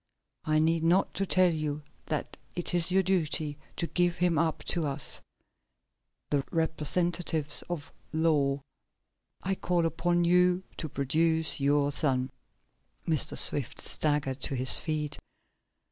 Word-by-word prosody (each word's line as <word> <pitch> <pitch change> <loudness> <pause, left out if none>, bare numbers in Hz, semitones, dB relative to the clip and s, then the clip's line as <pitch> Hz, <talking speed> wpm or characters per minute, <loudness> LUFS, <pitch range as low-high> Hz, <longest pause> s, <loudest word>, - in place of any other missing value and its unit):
I 155 0 +1
need 160 +1 +2
not 175 +4 +2
tell 185 -2 +2
you 150 -1 -3 0.2
that 150 - -3 0.2
it 175 0 -3
is 175 -1 +2
your 190 +1 +3
duty 155 -5 0 0.2
to 170 - -2
give 175 0 +1
him 175 -3 +1
up 160 -1 -1
to 170 -3 0
us 140 - -1 1.1
the 140 -2 +1
representatives 160 -1 0
of 160 -5 -5 0.2
the 155 - -5
law. 145 -4 +1 0.8
I 195 - 0
call 175 -2 0
upon 175 +1 0
you 180 +1 +3
to 155 - -4
produce 160 +4 0
your 145 +1 +2
son." 130 -3 0 0.8
Mr. 155 -4 0
Swift 135 -5 +3
staggered 145 -3 -1
to 135 - +4
his 130 0 +6
feet. 150 -2 -3
160 Hz, 130 wpm, -28 LUFS, 145-175 Hz, 1.1 s, his